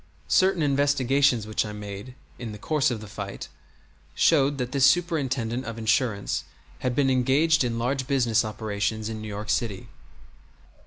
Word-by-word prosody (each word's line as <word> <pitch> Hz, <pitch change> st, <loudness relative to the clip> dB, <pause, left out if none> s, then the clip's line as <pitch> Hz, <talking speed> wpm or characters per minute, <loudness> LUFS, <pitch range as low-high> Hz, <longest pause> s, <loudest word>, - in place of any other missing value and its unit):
Certain 185 Hz, -3 st, +3 dB
investigations 140 Hz, -3 st, +2 dB
which 110 Hz, 0 st, 0 dB
I 105 Hz, -, -6 dB
made 105 Hz, +4 st, -8 dB, 0.2 s
in 115 Hz, -3 st, -6 dB
the -, -, -8 dB
course 150 Hz, +5 st, +1 dB
of 115 Hz, -4 st, -4 dB
the 110 Hz, -, -9 dB
fight 100 Hz, -1 st, -7 dB, 0.7 s
showed 145 Hz, -3 st, +3 dB
that 125 Hz, -2 st, -3 dB
this 135 Hz, -1 st, +1 dB
Superintendent 135 Hz, -6 st, +1 dB
of 115 Hz, -1 st, -6 dB
Insurance 110 Hz, -2 st, 0 dB, 0.4 s
had 125 Hz, -1 st, -1 dB
been 135 Hz, -1 st, +2 dB
engaged 135 Hz, +5 st, +3 dB
in 120 Hz, -2 st, -2 dB
large 130 Hz, +2 st, -1 dB
business 120 Hz, -5 st, +2 dB
operations 110 Hz, 0 st, -3 dB
in 110 Hz, -1 st, -5 dB
New 110 Hz, -, -6 dB
York 105 Hz, 0 st, -4 dB
City. 105 Hz, -5 st, -2 dB
120 Hz, 155 wpm, -25 LUFS, 110-140 Hz, 0.7 s, Certain